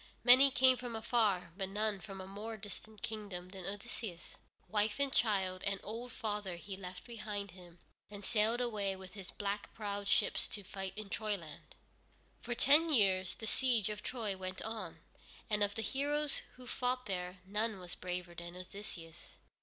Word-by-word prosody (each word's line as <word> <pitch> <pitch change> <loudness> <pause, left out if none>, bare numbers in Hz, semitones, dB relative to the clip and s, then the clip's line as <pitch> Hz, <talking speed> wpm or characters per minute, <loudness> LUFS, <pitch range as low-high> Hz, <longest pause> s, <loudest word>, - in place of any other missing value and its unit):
Many 255 +3 +9
came 260 -1 +6
from 245 -2 -4
afar, 210 -6 +2
but 190 -1 -2
none 210 0 0
from 195 -1 -7
a 190 - -5
more 210 +4 -5
distant 210 +1 -9
kingdom 200 -5 -4
than 190 -2 -6
Odysseus. 205 -3 -5 0.3
Wife 210 +2 +2
and 280 -1 +2
child 190 -4 +2
and 200 -1 +1
old 235 +4 -5
father 210 -5 -2
he 190 +3 -6
left 185 -1 -7
behind 210 -4 -4
him 175 -1 -13 0.3
and 205 -1 -7
sailed 225 +2 +3
away 205 -5 0
with 190 -1 -10
his 195 -3 -7
black 205 0 -2
prowed 205 -2 -3
ships - - +3
to 205 - -4
fight 190 -1 -5
in 210 -2 -6
Troyland. 200 -8 -3 0.7
For 240 - -2
ten 300 +7 +6
years 190 - +4
the 225 - -6
siege 235 -2 +3
of 210 0 -4
Troy 220 -6 -2
went 185 0 -5
on, 220 0 -5 0.5
and 210 0 +3
of 205 0 +2
the 225 - -1
heroes 285 +4 +1
who 255 - -11
fought 250 0 0
there, 180 -2 -3
none 210 +2 +1
was 180 -2 -6
braver 180 -1 -4
than 170 +1 -6
Odysseus. 180 -3 -9
205 Hz, 170 wpm, -36 LUFS, 190-225 Hz, 0.7 s, Many